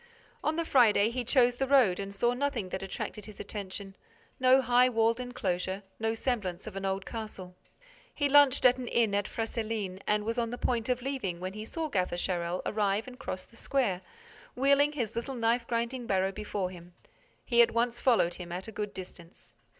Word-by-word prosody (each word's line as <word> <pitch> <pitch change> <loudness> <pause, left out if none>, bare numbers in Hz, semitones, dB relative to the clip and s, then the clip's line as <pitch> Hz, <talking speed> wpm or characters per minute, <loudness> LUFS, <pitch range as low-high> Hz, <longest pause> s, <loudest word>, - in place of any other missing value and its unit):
On 310 - +1
the 335 0 -1
Friday, 225 -6 +4
he 250 +1 -2
chose 245 0 +3
the 270 - 0
road 250 -10 +4
and 200 0 -4
saw 240 +5 +1
nothing 250 -7 -2
that 190 - -4
attracted 200 +2 -5
his 215 - -12
attention, 195 -1 -6 0.4
no 260 +1 +6
high 250 0 +4
walled 230 0 +2
enclosure, 195 -5 -2 0.2
no 225 0 0
semblance 205 -8 -2
of - - -8
an 195 0 -4
old 195 0 -1
castle. 215 -5 -7 0.6
He 290 - 0
lunched 285 -2 +5
at 250 +1 +6
an 250 - -5
inn 230 -4 +2
at 200 0 +1
Fresselines 220 -4 -3
and 210 0 +2
was 230 +3 -1
on 230 -1 0
the 245 - -5
point 240 -1 -1
of 250 -1 0
leaving 255 -11 -3
when 185 +1 -4
he 215 +1 -6
saw 320 +7 -3
Gaffer 185 -10 -1
Charel 175 0 -2
arrive 210 +1 0
and 255 0 -10
cross 185 -8 -5
the 230 - -22
square, 230 -8 0 0.5
wheeling 280 +2 +4
his 235 -8 -3
little 235 +3 -3
knife 235 0 +1
grinding 235 +1 -2
barrow 190 0 +1
before 200 -2 -3
him. 175 -1 -13 0.5
He 240 -2 +5
at 235 - +6
once 235 +1 0
followed 230 -9 +3
him 175 -1 -8
at 180 +4 -5
a - - -6
good 210 -1 -5
distance. 180 -2 -11
225 Hz, 195 wpm, -30 LUFS, 195-250 Hz, 0.6 s, no